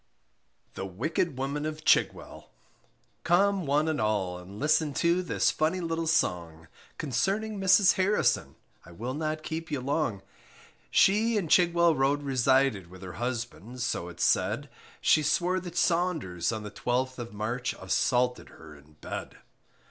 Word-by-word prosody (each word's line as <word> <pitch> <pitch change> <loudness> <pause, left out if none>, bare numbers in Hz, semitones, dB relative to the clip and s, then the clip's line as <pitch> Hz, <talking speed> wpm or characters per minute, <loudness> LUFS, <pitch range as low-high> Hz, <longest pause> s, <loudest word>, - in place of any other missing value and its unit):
THE 95 - -5
WICKED 150 - -2
WOMAN 135 +3 -3
OF 155 0 -7
CHIGWELL. - - +1 0.7
Come 190 0 +2
one 150 +3 +2
and 155 -3 -1
all, 95 -4 -1
and 95 +3 -11
listen 155 -1 +1
to 170 +2 +2
This 180 - +1
funny 160 +4 0
little 165 -1 -2
song, 85 - -1 0.3
Concerning 195 - -1
Mrs 190 0 +5
Harrison, 195 +3 +1 0.3
I 85 - -14
will 120 +8 -5
not 155 +1 -3
keep 160 +1 -5
you 145 -3 -2
long; 130 -7 -2 0.7
She 215 +3 +3
in 190 -5 -1
Chigwell 170 -1 +4
Road 145 +1 +1
resided, 130 -6 +2
With 95 +1 -13
her 90 -1 -7
husband, 120 0 -4
so 90 -7 -2
it's 85 0 -5
said, 110 +10 +1 0.3
She 155 - +4
swore 175 +5 +1
that 175 -1 -8
Saunders 160 - 0
on 110 -1 -4
the 105 - -7
12th 130 +4 -2
of 120 -1 -6
March, 110 +4 -3
Assaulted 125 -1 0
her 80 -1 -14
in 75 +2 -19
bed. - - -6
140 Hz, 150 wpm, -28 LUFS, 110-165 Hz, 0.7 s, Mrs